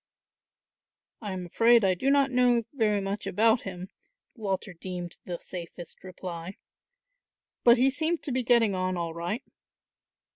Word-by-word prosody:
"I 210 -3 -4
am 185 -1 -4
afraid 230 +4 +4
I 190 - +4
do 260 +10 0
not 275 -1 +3
know 245 -2 +3
very 215 -6 +1
much 195 +1 -4
about 225 +4 +3
him," 185 -1 -7 0.4
Walter 195 -4 -3
deemed 175 0 -7
the 175 -1 -4
safest 175 -1 -9
reply; 180 -1 -7 1.1
"but 240 +1 +7
he 265 +3 +4
seemed 320 +4 -1
to 280 - -3
be 255 +1 0
getting 235 -4 +3
on 185 0 -1
all 170 -1 -3
right." 175 +10 -3
200 Hz, 145 wpm, -28 LUFS, 180-240 Hz, 1.1 s, but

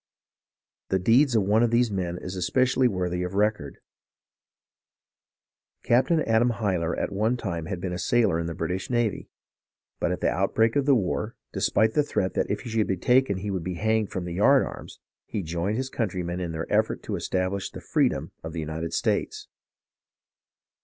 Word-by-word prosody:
The 95 - +2
deeds 120 +7 +4
of 110 - +4
one 105 +3 +3
of 120 - +3
these 120 0 +2
men 90 -3 -2
is 90 +1 -6
especially 130 +8 +2
worthy 90 -4 -2
of 90 +1 -4
record. 105 -9 0 2.1
Captain 145 +7 +3
Adam 115 +2 +3
Hyler 95 -7 -1
at - - -2
one 110 +5 0
time 85 -8 -4
had 95 -3 -4
been 90 0 -3
a 90 - -4
sailor 115 -9 +2
in 85 - -2
the 85 - -4
British 90 +3 -3
navy, 120 -5 -1 0.7
but - - 0
at - - -2
the - - +1
outbreak 110 +4 +1
of 140 -1 +1
the 140 - +6
war, 95 -7 -1 0.2
despite 110 0 +2
the 150 - +4
threat 95 - -1
that - - -1
if - - -2
he - - -7
should 110 -1 +1
be 95 - 0
taken 125 0 +3
he 100 +2 -4
would 95 -3 -2
be 90 +1 -3
hanged 110 +2 +1
from 90 -2 -4
the 90 - -5
yard 135 +9 +5
arms, - - -9 0.3
he 100 - -3
joined 85 +6 -2
his 130 0 -2
countrymen 90 -5 -2
in 85 -2 -3
their 80 0 -3
effort 110 +1 +1
to - - -3
establish 95 +1 -2
the - - -9
freedom - - 0
of 80 0 -6
the 85 - -4
United 80 +1 -4
States. - - -1
100 Hz, 185 wpm, -26 LUFS, 90-115 Hz, 2.1 s, the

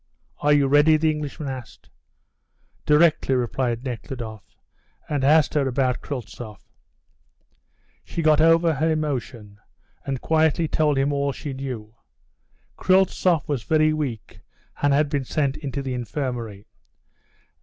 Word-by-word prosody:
"Are 150 - +2
you 145 -1 +4
ready?" 145 +3 +5
the 155 0 +2
Englishman 150 -1 -5
asked. 130 -3 -8 1.0
"Directly," 150 -3 +4
replied 120 -1 -1
Nekhludoff 120 -4 -6 0.6
and 145 -3 -1
asked 150 +2 +4
her 145 -3 +1
about 130 -1 0
Kryltzoff. 120 -5 -7 1.4
She 165 - -4
got 155 -1 +4
over 165 0 +4
her 155 +3 0
emotion 130 -9 -3 0.4
and 135 -2 -3
quietly 160 +2 +2
told 150 -2 +1
him 140 +2 +1
all 140 0 0
she 145 0 -6
knew. 125 -5 -6 0.8
Kryltzoff 185 -3 +2
was 145 -5 -1
very 155 +6 +2
weak 135 -8 -5 0.4
and 145 - +3
had 145 +2 +3
been 140 -2 -1
sent 140 +1 -1
into 140 -2 -5
the 130 -1 -3
infirmary. 120 -5 -4
140 Hz, 125 wpm, -23 LUFS, 125-155 Hz, 1.4 s, ready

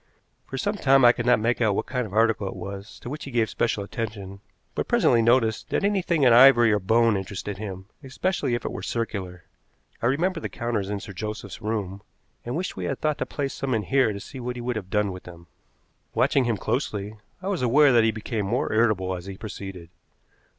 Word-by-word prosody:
For 135 - -5
some 205 +9 -1
time 135 -6 +5
I 120 - +9
could 120 0 -4
not 125 -3 +5
make 115 +3 0
out 105 -4 +3
what - - -1
kind 125 -2 -2
of - - -13
article 110 -2 +2
it - - -5
was 100 +1 -8
to - - -7
which 150 - -6
he - - -7
gave 115 -4 0
special 110 -3 0
attention, 100 -2 -6 0.3
but - - -2
presently 115 - +4
noticed 115 -1 +2
that - - 0
anything 190 -6 +1
in 125 -3 +6
ivory 120 -2 +7
or 105 - +2
bone 115 +3 +3
interested 95 +1 -5
him, 95 -3 -6 0.2
especially 135 -1 -1
if 120 - -5
it - - -2
were - - -6
circular. 95 -6 -4 0.6
I 115 - +2
remembered 165 +6 0
the - - -4
counters 115 -5 -2
in 105 -1 -3
Sir 100 - -9
Joseph's 105 0 -6
room, 100 -3 -3 0.4
and 120 +2 -4
wished 180 +4 -3
we - - -4
had - - -2
thought 150 -1 -1
to - - -2
place 140 -2 -3
some 130 -2 -2
in 110 - -1
here 135 -3 +2
to 100 - -5
see 130 +6 -9
what 125 0 -4
he 120 - -6
would 125 0 -2
have 100 -4 -5
done 105 -1 +1
with 90 0 -9
them. 85 -1 -12 0.7
Watching 135 -3 +3
him 115 -3 0
closely, 105 -2 -3 0.2
I 185 - -7
was 190 -7 -1
aware 140 +4 +5
that 120 -2 +5
he 110 - +3
became 110 -1 -3
more 120 +3 -1
irritable 105 -5 +2
as 90 +1 -8
he 95 -1 -7
proceeded. 95 -5 -8
115 Hz, 225 wpm, -25 LUFS, 100-125 Hz, 0.7 s, I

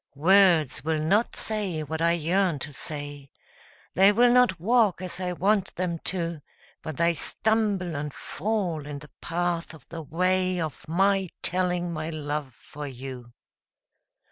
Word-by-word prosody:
Words 170 -4 +4
will 160 0 0
not 205 +9 +2
say 200 -8 -2
what 160 +2 -4
I 170 0 +4
yearn 170 +1 +1
to 145 +2 -7
say 145 -1 -5 0.6
They 195 +3 +6
will 240 +3 +5
not 245 -8 +4
walk 215 0 +3
as 180 -1 -6
I 180 -1 -2
want 195 +2 +1
them 170 -2 -2
to, 170 -4 -2 0.4
But 155 -3 -6
they 170 0 +3
stumble 200 0 0
and 145 +1 -3
fall 175 -3 -3
in 145 -1 -5
the 145 0 -13
path 170 -1 -2
of 135 -4 -17
the 165 -1 -6
way 185 +3 +1
Of 160 -4 -5
my 195 +2 +2
telling 180 -1 0
my 155 0 -3
love 150 -4 -4
for 145 0 -8
you. 125 -2 -8
170 Hz, 150 wpm, -26 LUFS, 150-190 Hz, 0.6 s, They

